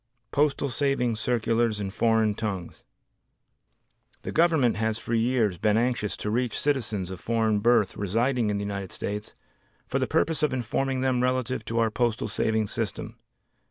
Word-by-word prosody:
Postal 145 -1 +1
Savings 125 -4 0
Circulars 115 -2 +1
in 100 -2 -3
Foreign 110 0 +2
Tongues 100 -5 -5 1.4
The - - -4
Government 160 -9 +3
has 110 0 0
for 120 - -4
years 115 -5 +1
been 105 0 +2
anxious 120 -3 0
to 105 - -3
reach 120 0 0
citizens 110 -10 -1
of 95 - -6
foreign 110 -1 +1
birth 115 -3 +3
residing 115 +4 +1
in 105 - 0
the 100 - -3
United 100 -2 -4
States 105 +1 -5 0.5
for - - -1
the - - 0
purpose 160 0 +1
of 150 -3 +1
informing 130 +2 -1
them 130 -1 +1
relative 130 -2 0
to 115 - -3
our 115 -1 +2
Postal 120 -1 0
Savings 110 0 0
System. - - -4
115 Hz, 160 wpm, -26 LUFS, 105-125 Hz, 1.4 s, Government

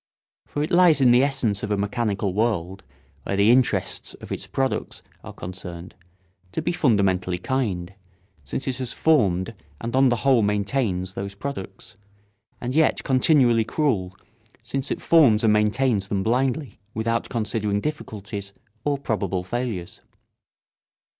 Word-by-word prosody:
For 145 - -2
it 155 - -4
lies 175 -4 +6
in 130 -3 +5
the 120 +1 +6
essence 125 -8 0
of 105 - -4
a 105 - +1
mechanical 100 -2 -1
world, 95 -4 -1 0.4
where 100 - -3
the 100 +3 +5
interests 125 0 +1
of - - -12
its - - -4
products 135 -1 -2 0.2
are - - -8
concerned, 90 -1 -8 0.6
to - - -1
be 175 - 0
fundamentally 95 - +1
kind, 95 -6 -2 0.5
since 70 - -4
it 130 -2 -1
has 130 -3 -4
formed 100 - +2 0.3
and 115 +2 -4
on 135 0 +5
the 120 - +2
whole 130 -4 +5
maintains 100 -2 0
those 100 0 -5
products, 100 -5 -7 0.6
and 125 +1 -3
yet 155 +1 +2
continually 130 -4 +4
cruel, 105 - -1 0.5
since 135 +4 -3
it - - -3
forms 130 -11 +5
and 110 -1 +4
maintains 105 0 +2
them 95 -1 -1
blindly, 130 +2 -1 0.2
without 115 +1 -1
considering 105 -2 -1
difficulties 100 -7 -5 0.3
or 145 -1 0
probable 100 -8 -2
failures. 105 -3 -4
110 Hz, 140 wpm, -24 LUFS, 100-130 Hz, 0.6 s, lies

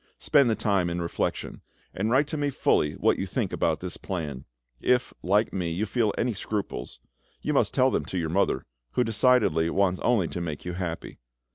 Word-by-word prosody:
Spend 140 -4 +4
the 110 - +2
time 95 -5 +1
in 85 +1 -2
reflection, 85 -1 -3 0.3
and 105 +4 -1
write 135 +5 +4
to 155 - -4
me 145 -1 0
fully 75 - +2
what - - +1
you - - -2
think - - -2
about - - 0
this - - -4
plan. 75 -8 -5 0.4
If, 125 0 +2
like 105 +4 +2
me, 90 -3 -1
you 90 +6 -1
feel 110 0 +1
any 120 0 0
scruples, 100 - -4 0.4
you - - 0
must - - +3
tell - - +3
them - - 0
to 95 - -4
your 80 -3 -1
mother, 95 +5 +1 0.3
who 125 - +3
decidedly 110 -8 +3
wants 95 0 +1
only 115 -8 +2
to 85 - -4
make 80 -2 -5
you 90 - -3
happy. 85 -2 -5
95 Hz, 195 wpm, -27 LUFS, 85-115 Hz, 0.4 s, Spend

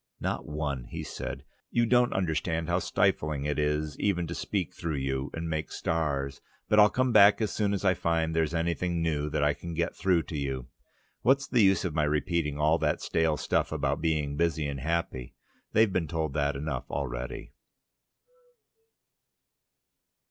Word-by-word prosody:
"Not - - -3
one," 75 -5 -3 0.2
said - - -6 0.3
he. - - -1
"You - - +4
don't 125 +1 +3
understand 80 -2 -1
how 90 +1 +1
stifling 75 -4 0
it 75 0 -1
is 75 0 -1
even 90 -4 +1
to 85 - -5
speak 95 -1 -2
through 85 -4 -3
you 65 0 -2
and 80 0 -4
make 80 -1 -3
stars. 70 -4 -2 0.3
But 105 - +4
I'll 105 0 +8
come 130 +3 +1
back 100 -1 +7
as 110 -2 -1
soon 105 -2 +1
as 100 0 -2
I 95 - +5
find 80 -2 0
there's 80 0 +1
anything 85 +1 0
new 75 -2 0
that 75 - 0
I 75 0 +3
can 85 +2 -7
get 85 +1 -1
through 90 -4 +2
to 80 - -7
you. 65 -3 -3 0.6
What's 135 +1 +3
the 125 -3 +3
use 95 -3 +4
of 85 - -2
my 75 -1 +1
repeating 75 0 0
all 80 +2 +3
that 75 -1 +1
stale 80 -2 +1
stuff - - 0
about 75 -2 -1
being 75 -3 0
busy 80 -1 0
and 70 -1 -3
happy? 75 -4 -2 0.4
They've 110 -3 +4
been 85 -3 0
told 80 -2 -2
that 70 -1 0
often 70 - -4
enough 75 -5 -4
already." 65 -2 -4
80 Hz, 175 wpm, -28 LUFS, 75-90 Hz, 0.6 s, I'll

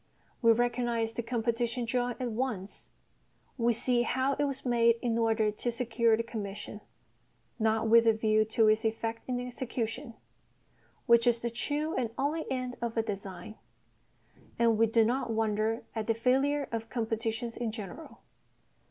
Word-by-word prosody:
We 230 -2 +6
recognise 240 -1 0
the 235 - -2
"competition" 235 +1 -1
drawing 245 +1 -1
at 250 -2 -2
once; 220 -5 -4 0.7
we 235 -2 +2
see 240 +1 +1
how 260 +3 +1
it 290 +1 0
was 275 -1 -3
made 235 -1 +4
in 235 -2 +1
order 225 -2 +2
to 240 +3 -3
secure 230 -1 +2
the 230 - -1
commission, 210 -2 -6 0.8
not 220 0 +1
with 230 +1 +6
a 225 - +6
view 215 0 +3
to 220 0 +3
its 215 +1 +3
effect 225 +1 -2
in 250 -1 0
execution 245 -1 -4 0.9
(which 235 -1 +5
is 235 -1 +3
the 235 - -2
true 295 +6 -2
and 240 -3 -1
only 295 +4 -1
end 255 -1 -3
of 235 -1 -3
a 225 - +3
design), 195 -1 -7 1.0
and 230 -1 +4
we 225 - +5
do 225 0 +4
not 245 +2 0
wonder 220 0 0
at 220 -2 -3
the 225 - +2
failure 270 +4 +1
of 225 0 -4
competitions 225 0 -2
in 235 -2 -2
general. 215 - -9
230 Hz, 160 wpm, -30 LUFS, 225-245 Hz, 1.0 s, We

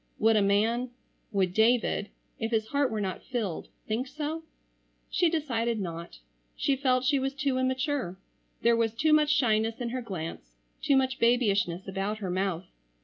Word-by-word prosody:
Would 225 +1 +4
a 210 - +4
man,—would 210 -2 -1
David,—if 225 0 0
his 220 -1 0
heart 280 -2 +2
were 220 -2 -2
not 190 -2 -3
filled,—think 225 +1 -4
so? 305 +4 -4 0.7
She 350 - +3
decided 235 -8 -1
not. 170 - -6 0.4
She 275 - +1
felt 255 -2 +2
she 280 0 +3
was 270 +1 -2
too 270 -2 0
immature. 260 - -1 0.5
There 235 0 +5
was 230 -1 0
too 310 +6 +3
much 305 -1 +4
shyness 225 -5 +2
in 240 -1 -2
her 255 +2 -3
glance, 160 - -6 0.3
too 280 - +3
much 260 0 +1
babyishness 200 -7 +2
about 195 +2 -2
her 195 -4 -4
mouth. 185 -1 -1
230 Hz, 150 wpm, -28 LUFS, 200-260 Hz, 0.7 s, There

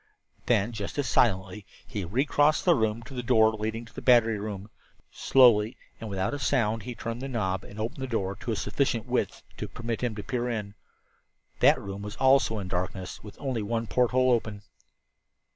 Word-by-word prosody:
Then, 105 +5 +2
just 105 +1 -6
as 145 -3 0
silently, 95 -4 +1 0.2
he 105 - -5
re 120 - 0
crossed 150 +1 +2
the 175 - +6
room 110 -4 0
to 125 - -11
the 125 - -3
door 110 -2 +4
leading 110 +2 -4
to 115 - -17
the - - -7
battery 115 -4 +4
room; 105 0 -6 0.4
slowly 120 -4 +4 0.2
and 110 - -6
without 95 +5 -1
a 145 - -3
sound 115 -5 +1
he 120 +4 -7
turned 115 +2 -5
the 135 - -4
knob 95 -7 -2
and 105 - -11
opened 115 +5 -4
the 130 - -2
door 100 -5 -2
to 120 -1 -4
a - - 0
sufficient 120 -1 -1
width - - -2
to - - -4
permit 115 0 -5
him 120 -3 -1
to 105 - -6
peer 125 -1 -2
in. 105 -4 -4 0.9
That - - +5
room 100 0 -7 0.2
also 135 -3 +4
was 105 - -3
in - - -7
darkness, 95 0 -4
with 105 - -11
only 130 -5 -2
one 115 +2 -2
porthole 125 +2 +2
open. 110 -3 -1
115 Hz, 195 wpm, -27 LUFS, 105-125 Hz, 0.9 s, the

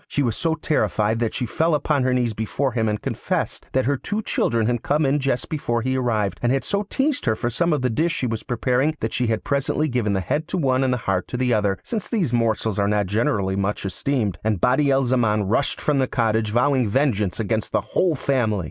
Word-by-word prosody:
She 145 - 0
was 115 -4 0
so 165 -1 0
terrified 110 -8 0
that 115 -2 -1
she 125 - -1
fell 160 +7 +1
upon 150 -1 +1
her 130 0 +1
knees 125 -3 +1
before 110 +6 -1
him 110 -3 0
and 105 0 -1
confessed - - -3
that 130 0 +2
her 140 +2 +1
two 215 +10 -3
children 115 - 0
had 120 0 0
come 150 +2 +1
in 140 +2 +2
just 135 -3 -1
before 120 -7 -2
he 130 +1 0
arrived, 110 -6 0
and 120 - +2
had 135 0 +1
so 200 0 -2
teased 280 +1 0
her 110 -3 +2
for 120 +2 -2
some 170 +8 +1
of 145 -4 0
the 125 - +2
dish 160 +8 +1
she 170 - -2
was 115 -2 -2
preparing 130 +5 0
that 110 - -3
she 125 - 0
had 110 -1 -1
presently 140 +2 0
given 120 -6 0
the 95 - +1
head 150 - -2
to 185 - -2
one 135 -5 +2
and 130 - +1
the 125 - +1
heart 90 -2 0
to 125 - -4
the 125 -1 +1
other, 100 -3 +1
since 220 -4 -4
these 180 - -1
morsels 110 -3 0
are 100 - +2
not 105 0 +1
generally 100 -1 0
much 100 +1 -2
esteemed; 105 +1 -1
and 110 -3 0
Badi 140 +5 +3
al 135 0 +3
Zaman 115 -4 +2
rushed 115 +8 0
from 145 -2 +1
the 130 - +2
cottage 110 -2 0
vowing 125 +1 +2
vengeance 105 -6 0
against 110 0 -1
the - - +1
whole 160 - 0
family. 120 -7 0
125 Hz, 240 wpm, -22 LUFS, 110-140 Hz, -, Badi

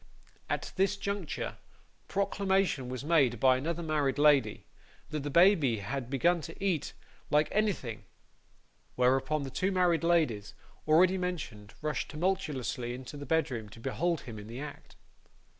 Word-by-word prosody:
At - - -3
this 195 +2 +2
juncture, 200 -4 -4 0.5
proclamation 195 -8 0
was 130 +2 -5
made 145 -7 +3
by 130 -1 +5
another 165 +5 -3
married 150 -4 0
lady, 145 -7 +3 0.5
that 155 - -2
the 145 - -3
baby 165 - +5
had 120 +5 -4
begun 170 +6 +2
to 165 +1 -9
eat 175 -7 0 0.4
like 150 +1 +3
anything; 195 - -1 0.9
whereupon 130 +4 +2
the 135 - -6
two 190 +8 0
married 180 -3 +2
ladies, 120 -12 +1 0.3
already 180 +4 +5
mentioned, 145 - -5
rushed 150 -4 -2
tumultuously 150 -8 -2
into 130 +3 -9
the 145 -1 -8
bedroom 130 -8 0
to 110 - -13
behold 165 +6 -1
him 110 -3 -8
in 105 - -10
the 115 +3 -7
act. 145 0 -9
150 Hz, 140 wpm, -30 LUFS, 125-175 Hz, 0.9 s, by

